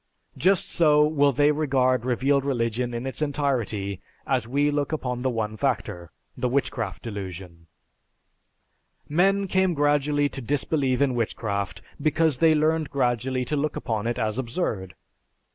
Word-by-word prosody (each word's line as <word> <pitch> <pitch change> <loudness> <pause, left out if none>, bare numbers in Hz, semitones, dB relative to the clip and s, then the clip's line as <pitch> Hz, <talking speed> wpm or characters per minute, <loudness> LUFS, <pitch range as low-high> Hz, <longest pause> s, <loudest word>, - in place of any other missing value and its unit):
Just 190 +1 +2
so 150 -3 +4
will 145 -2 +3
they 145 +2 +3
regard 130 -5 +1
revealed 135 +2 +1
religion 120 -2 -1
in 120 +1 -4
its 135 +3 -4
entirety 120 -10 -1 0.2
as 125 -4 0
we 145 +4 +1
look 145 0 -1
upon 125 -5 -3
the 130 - +1
one 110 -3 -2
factor, 100 - -2 0.3
the 125 - -1
Witchcraft 125 -6 -2
Delusion. 95 -6 -7 1.4
Men 195 +6 +2
came 190 -2 +1
gradually 145 0 +2
to 135 - -7
disbelieve 135 +1 0
in 135 -2 +1
witchcraft 100 -5 -3 0.2
because 155 -3 +2
they 160 -1 +5
learned 155 0 +1
gradually 125 -1 0
to 150 - -2
look 150 +1 -1
upon 110 -1 -2
it 120 - -1
as 110 +3 -1
absurd. 115 - -3
130 Hz, 145 wpm, -25 LUFS, 115-150 Hz, 1.4 s, they